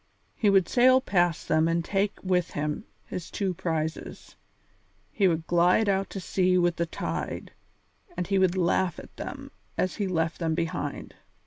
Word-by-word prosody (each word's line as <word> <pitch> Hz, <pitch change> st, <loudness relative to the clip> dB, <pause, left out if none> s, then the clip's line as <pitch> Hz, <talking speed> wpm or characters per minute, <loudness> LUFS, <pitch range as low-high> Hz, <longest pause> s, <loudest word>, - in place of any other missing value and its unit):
He 210 Hz, -, +2 dB
would 195 Hz, -3 st, +4 dB
sail 255 Hz, +1 st, +5 dB
past 175 Hz, -, +1 dB
them 160 Hz, +1 st, +3 dB
and 165 Hz, 0 st, 0 dB
take 200 Hz, 0 st, 0 dB
with 180 Hz, -2 st, 0 dB
him 150 Hz, +7 st, -3 dB, 0.2 s
his 180 Hz, -, -6 dB
two 195 Hz, -3 st, -1 dB
prizes; 160 Hz, -2 st, -4 dB, 0.8 s
he 195 Hz, -, +3 dB
would 165 Hz, -2 st, 0 dB
glide 175 Hz, +6 st, +3 dB
out 195 Hz, 0 st, +1 dB
to 195 Hz, -, -5 dB
sea 185 Hz, 0 st, +1 dB
with 175 Hz, -1 st, +2 dB
the 170 Hz, -, 0 dB
tide, 85 Hz, -, -4 dB, 0.7 s
and 180 Hz, -, -1 dB
he 195 Hz, +2 st, +1 dB
would 185 Hz, -1 st, +2 dB
laugh 175 Hz, -1 st, +1 dB
at -, -, -12 dB
them -, -, -7 dB, 0.3 s
as 185 Hz, -, -1 dB
he 205 Hz, -3 st, -1 dB
left 165 Hz, -2 st, -1 dB
them 165 Hz, -2 st, 0 dB
behind. 165 Hz, -1 st, -3 dB
180 Hz, 165 wpm, -27 LUFS, 165-195 Hz, 0.8 s, sail